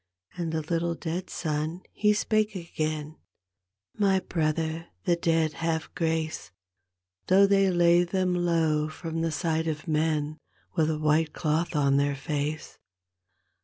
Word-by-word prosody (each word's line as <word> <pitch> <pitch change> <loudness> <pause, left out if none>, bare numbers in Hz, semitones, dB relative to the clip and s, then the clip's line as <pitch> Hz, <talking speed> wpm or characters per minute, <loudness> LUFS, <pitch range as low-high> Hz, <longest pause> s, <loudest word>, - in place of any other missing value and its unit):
And 170 -2 -3
the 160 -1 -2
little 170 +1 -1
dead 175 +3 -4
son 155 +2 -3
he 210 0 +3
spake 215 0 +1
again, 155 -3 -3 0.4
" 95 0 -43
My 195 -2 +4
brother, 160 -1 -1 0.2
the 175 - +3
dead 165 -2 +1
have 160 0 -2
grace 160 - -2 0.8
Though 195 +2 +6
they 195 -1 +4
lay 175 -1 +4
them 180 +1 0
low 165 -3 +1
from 165 0 -4
the 165 0 0
sight 160 +1 -1
of 155 +1 -3
men 155 -1 0 0.4
With 160 -3 +2
a 155 - 0
white 155 +1 +2
cloth 160 +1 -1
on 140 -2 +3
their 140 0 +1
face. 150 +1 -4
160 Hz, 140 wpm, -27 LUFS, 155-175 Hz, 0.8 s, Though